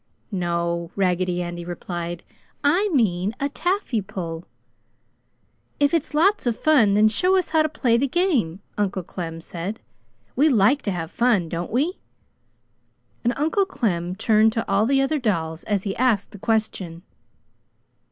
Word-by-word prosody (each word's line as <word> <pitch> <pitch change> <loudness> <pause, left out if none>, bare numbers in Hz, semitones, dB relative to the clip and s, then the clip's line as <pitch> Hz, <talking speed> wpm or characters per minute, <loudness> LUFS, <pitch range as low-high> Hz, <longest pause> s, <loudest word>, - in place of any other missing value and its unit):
"No," 170 -2 -1
Raggedy 180 -2 0
Andy 175 0 -5
replied, 175 0 -5 0.4
"I 355 +9 +3
mean 210 - +1
a 280 - 0
taffy 350 - -1
pull!" 170 -3 -6 1.3
"If 285 +1 +3
it's 320 -2 -1
lots 375 -1 +3
of 235 - 0
fun, 245 -11 +4
then 215 +1 +5
show 360 - +3
us 370 - 0
how 320 -1 +4
to 310 - +1
play 250 -6 +1
the 275 +4 +1
game!" 255 - 0 0.2
Uncle 195 -2 -1
Clem 165 -1 -6
said. 180 +6 -5 0.6
"We 300 +4 +4
like 245 +3 +4
to - - 0
have 170 -2 -4
fun, 225 -9 +2
don't 170 +1 -4
we?" 295 - 0 1.2
And 240 - +2
Uncle 325 +7 +1
Clem 180 - -1
turned 220 +2 +3
to 225 - -2
all 200 +3 +2
the 270 +1 +3
other 290 +3 0
dolls 165 -9 -1
as 205 -3 0
he 195 -2 -3
asked 230 -6 +1
the 205 - -11
question. 190 -6 -2
210 Hz, 150 wpm, -23 LUFS, 175-280 Hz, 1.3 s, then